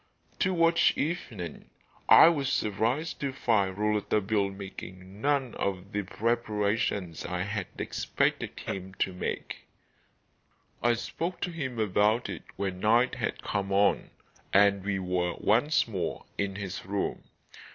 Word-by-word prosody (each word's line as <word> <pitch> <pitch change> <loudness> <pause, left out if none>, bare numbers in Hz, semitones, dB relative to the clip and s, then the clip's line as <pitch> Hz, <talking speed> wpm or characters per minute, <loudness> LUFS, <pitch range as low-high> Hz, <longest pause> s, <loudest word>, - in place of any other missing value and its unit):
Towards 170 -2 +4
evening 110 - -4 0.4
I - - +10
was 145 -6 +2
surprised 120 +8 0
to 140 -3 -1
find 100 -7 +1
Rouletabille 105 -1 +1
making 95 0 -9
none 140 -3 +1
of 95 0 -3
the 105 - -1
preparations 105 -4 -1
I 90 +1 -2
had 105 -1 -3
expected - - -1
him 95 0 -5
to 95 - -1
make. 90 - -5 1.1
I 120 0 +3
spoke 170 +9 -4
to 180 - -1
him 130 -7 -4
about 110 +2 +2
it - - -5
when 95 -2 -3
night 115 +5 +3
had 120 -4 -3
come 100 -1 -2
on, 100 +1 +3 0.4
and 100 -1 +4
we 100 -1 -1
were 90 -2 -1
once 125 +9 +2
more 95 -6 -3
in 100 -1 -2
his 95 -2 -5
room. 100 +1 -2
105 Hz, 130 wpm, -29 LUFS, 95-120 Hz, 1.1 s, I